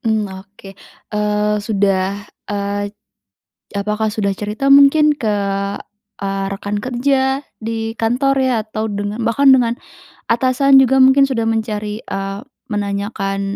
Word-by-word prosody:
Hmm, 220 -2 0
oke, 195 +1 -12 0.4
eee, 210 0 0
sudah 200 -1 0 0.2
eee, 205 0 -2 1.0
apakah 210 +1 -1
sudah 200 -2 -1
cerita 210 +7 -3
mungkin? 285 +2 +6
Ke, 215 -6 -1 0.8
eee, 195 0 -2
rekan 205 +1 -3
kerja 265 +1 +1 0.2
di 225 0 -3
kantor 250 +5 +1
ya, 260 -1 +1
atau 215 0 -3
dengan 205 +3 -3
bahkan 270 +4 +3
dengan, 240 -2 0 0.5
atasan 255 +3 +3
juga 265 +1 +2
mungkin 265 +1 +6
sudah 235 -5 0
mencari 215 -1 -2
eee, 195 0 -4 0.3
menanyakan, 200 -1 -3
215 Hz, 120 wpm, -18 LUFS, 205-255 Hz, 1.0 s, mungkin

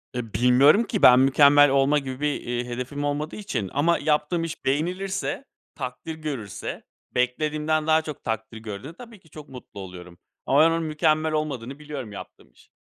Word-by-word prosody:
E, 115 -4 -5
bilmiyorum 130 - +5
ki, 210 -3 -3
ben 125 0 +8
mükemmel 140 +2 +6
olma 140 +2 +3
gibi 130 -2 -7
bir, 150 -1 -1
iii, 120 0 -3
hedefim 125 +4 -5
olmadığı 145 +2 -2
için 195 - -4
ama 160 +5 +2
yaptığım 155 +2 0
iş 165 0 -7
beğenilirse, 185 - -2 0.3
takdir 125 +6 -6
görürse, 140 - -6 0.3
beklediğimden 150 +5 0
daha 160 0 +4
çok 155 -2 -8
takdir 110 0 -4
gördüğünde, 110 +6 -8
tabii 230 +2 -13
ki 165 - -24
çok 150 0 -12
mutlu 125 -6 -11
oluyorum 90 -2 -10 0.3
ama 140 - +3
ben 160 - +7
onun 165 0 -1
mükemmel 155 0 +1
olmadığını 140 -3 -3
biliyorum 145 -7 -7
yaptığım 100 - -11
işin. - - -24
145 Hz, 170 wpm, -24 LUFS, 125-155 Hz, 0.3 s, ben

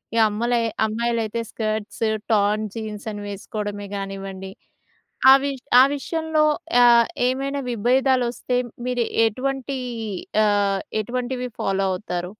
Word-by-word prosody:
ఈ - - +1
అమ్మలే 235 +3 0 0.3
అమ్మాయిలైతే 230 0 -1
skirts, 215 0 -3 0.3
torn 210 +1 +2
jeans 215 -1 -6
అని 205 0 -6
వేసుకోవడమే 205 0 -5
గానివ్వండి. 195 -1 -6 0.8
అవి 275 +1 +3 0.3
ఆ - - +9
విషయంలో 320 +1 0 0.4
ఆహ్, 235 -1 +6 0.2
ఏమైనా 275 +2 -1
విభేదాలొస్తే 250 +1 +1 0.3
మీరెటువంటి 255 +3 0 0.7
ఆహ్, 200 -1 +2 0.2
ఎటువంటివి 250 +2 -3
ఫాలో 195 0 0
అవుతారు? 180 -2 -4
225 Hz, 95 wpm, -23 LUFS, 205-250 Hz, 0.8 s, ఆ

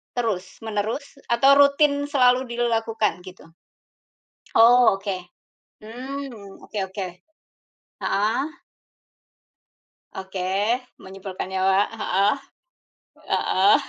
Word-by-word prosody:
terus-menerus, 220 +4 -3
atau 270 +4 +5
rutin 285 0 +4
selalu 255 -2 +3
dilakukan 225 -5 0
gitu? 185 0 -12 1.1
Oh, 235 -1 +6
Oke. 195 -2 -4 0.6
Mmm, 245 -3 -8
oke 210 - -5
oke, 190 0 -5 1.0
Heeh. 215 +6 +1 1.7
Oke. 190 0 -5 0.6
Menyimpulkan 190 0 -7
nyawa, 190 0 +2
heeh. 200 -2 +1 1.0
Heeh, 190 +2 +4
225 Hz, 75 wpm, -23 LUFS, 195-250 Hz, 1.7 s, Oh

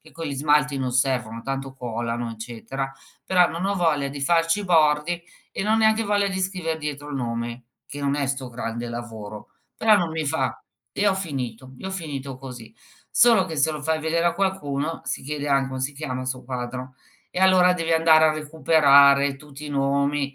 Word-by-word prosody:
che - - -18
con 165 0 -7
gli 140 - -3
smalti 150 0 +2
non 130 -2 -2
servono 120 -3 0
tanto 135 0 -4
colano, 120 -1 -3
eccetera, 120 +4 -5 0.3
però 180 -2 +4
non 170 +3 -4
ho 200 - 0
voglia 155 -6 +1
di 140 0 -7
farci 165 +5 +2
i - - -5
bordi, 160 0 +3 0.3
e - - -3
non 215 +2 +2
ho - - +3
neanche 220 0 +3
voglia 205 -1 +1
di 190 -1 -3
scriver 180 -4 -2
dietro 145 -1 -5
il 145 - -4
nome, 120 0 -4 0.2
che 145 - -8
non 140 0 0
è 145 -1 -1
'sto 135 -1 -3
grande 120 0 -5
lavoro. 110 -3 -7 0.3
Però, 220 -1 +5
non 175 -4 0
mi 160 -1 -2
fa 160 +3 -1 0.3
e - - -5
io 205 - +5
ho - - 0
finito, 130 - -5
io 190 - -6
ho - - -5
finito 140 -7 -5
così. 125 -4 -10 0.4
Solo 225 -4 +5
che 160 -3 -6
se 155 +3 +3
lo 150 -1 -6
fai 160 +1 0
vedere 165 +2 0
a 175 - +3
qualcuno, 165 -5 -2
si - - -4
chiederà: 145 -1 0
"Come 130 0 -5
si 135 +2 -2
chiama 130 -3 -4
il 130 - -7
suo 130 -1 -5
quadro?" 125 0 -5 0.4
E - - -4
allora 185 -1 +5
devi 165 -2 -1
andare 160 -1 +5
a 155 - +4
recuperare 140 -2 +4
tutti 150 +1 -11
i - - -6
nomi, 140 0 0
145 Hz, 205 wpm, -24 LUFS, 130-165 Hz, 0.4 s, Però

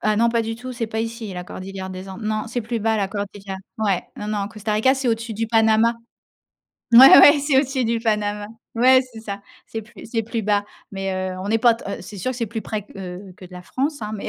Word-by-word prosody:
Ah 215 0 +1
non, 235 +2 +3
pas 230 -1 +1
du 225 0 -4
tout, 255 +2 -7
c'est 235 -2 -3
pas 220 0 -2
ici 225 -2 -5
la 180 -1 -6
cordillère 190 +1 -7
des 185 +1 -8
Andes. 190 +3 -8
Non, 215 0 -1
c'est 245 +2 -2
plus 230 0 -3
bas 220 +1 +1
la 200 -2 0
cordillère. 200 -1 -6 0.2
Ouais, 200 -4 +1
non, 210 - -6
non, 205 -2 -2
Costa 215 0 -4
Rica, 220 +6 +3
c'est 265 -2 -2
au-dessus 230 0 -1
du 225 +2 -2
Panama. 225 +1 +3 1.0
Ouais, 260 +3 +10
ouais, 290 +1 +8
c'est 280 -1 +3
au - - +5
dessus 265 -2 -2
du 230 +1 0
Panama. 210 -2 -1 0.3
Ouais, 255 +2 +6
c'est 225 - -9
ça. 200 -2 -6 0.3
C'est 225 - -6
plus 230 +1 -13
c'est 225 0 -1
plus 225 0 -3
bas, 205 0 +1 0.3
mais 195 0 -3 0.2
heu, - - -7
on 200 - -5
n'est 225 +2 +2
pas 235 0 +5
t 230 - -12
heu, - - -5
c'est 205 - -10
sûr 225 +8 -2
que 255 - -5
c'est 235 -2 -2
plus 220 +1 -5
près 210 -2 -4
q - - -17
heu, 185 0 -8
que - - -13
de 180 - -14
la 180 0 -9
France, 285 - -2
hein, 210 0 -4
mais 205 - -5
220 Hz, 265 wpm, -22 LUFS, 200-235 Hz, 1.0 s, Ouais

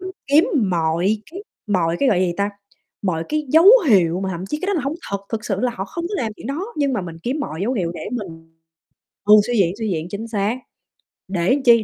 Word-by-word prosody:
mình 375 +1 -6 0.2
kiếm 290 +4 +5 0.2
mọi 170 +5 +1
cái 380 +4 -8 0.2
mọi 175 -5 +1
cái, 275 - +3
gọi 185 -6 +3
gì 180 -2 +1
ta, 200 +1 0 0.5
mọi 165 -5 -1
cái 305 0 -1
dấu 320 +6 +5 0.2
hiệu 180 -5 +4
mà 190 - -2
thậm 175 +2 -5
chí 300 - -3
cái 375 - -3
đó 405 - +1
là 335 - 0
hông 275 +3 -2 0.2
thật, 200 - -1
thực 220 -1 -3
sự 195 -2 -2
là 250 +1 +1
họ 190 - -3
không 335 - -6
có 415 - -4
làm 220 -2 -2
chuyện - - -9
đó 280 +5 -3 0.2
nhưng 285 -2 +1
mà 240 - 0
mình 170 -2 -7
kiếm 270 +5 -2
mọi 165 - -4
dấu 235 +5 0
hiệu 180 -9 -1
để - - -6
mình 165 -8 -7 0.7
ừ, 210 +1 +7
suy 240 -1 0
diễn, 185 -1 +2
suy 220 -2 -2
diễn, 160 -3 -2
chính 220 +3 -5
xác, 215 +2 -1 0.7
để 190 +9 +1
chi, 230 -2 +6
205 Hz, 245 wpm, -21 LUFS, 180-260 Hz, 0.7 s, ừ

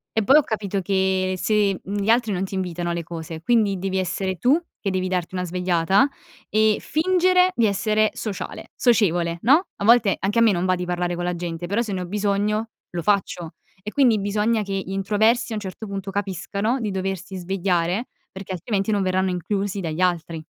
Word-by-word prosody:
e 220 - +2
poi 275 +8 +6
ho 305 - +5
capito 205 -4 -2
che 190 0 +1
se, 205 -2 +1
mhmm, 205 +2 -3
gli 205 - -1
altri 230 -1 +3
non 190 +1 -1
ti 195 - -6
invitano 175 -2 -2
alle 170 0 -3
cose; 165 -1 -7
quindi 210 -1 +2
devi 190 0 -2
essere 190 0 -2
tu 270 - +3 0.2
che 195 - -2
devi 185 0 -1
darti 180 -1 -2
una 180 - -2
svegliata 180 +5 +2 0.4
e 215 0 +3
fingere 365 +2 +3
di 230 - +3
essere 215 +1 +2
sociale 210 -4 -6
socievole, 175 -8 +2
no; 295 - +4
a 200 - -3
volte 230 -3 +5
anche 205 +4 0
a - - +4
me 230 -2 +6
non 180 -1 0
va 185 0 +2
di 180 0 -4
parlare 175 0 -1
con 175 - -4
la 180 0 -1
gente, 170 0 -5
però 200 +6 0
se 220 -4 -3
ne 185 - -2
ho - - -4
bisogno, 210 +2 0 0.2
lo 175 - -3
faccio. 180 -3 0 0.3
E 210 - -4
quindi 250 -5 +4
bisogna 210 +3 +1
che 195 - -7
gli 195 0 -3
introversi, 215 +5 +1
a - - -2
un 210 - -3
certo 200 +3 -7
punto, 195 0 -5
capiscano 200 +4 -2
di 220 -3 -2
doversi 190 0 -4
svegliare 180 +3 -1 0.2
perché, 190 0 -7
altrimenti, 195 +3 -1
non 205 -1 +1
verranno 185 0 +1
inclusi 195 +2 -2
dagli 160 -1 -4
altri. 170 -3 0
195 Hz, 205 wpm, -23 LUFS, 180-215 Hz, 0.4 s, poi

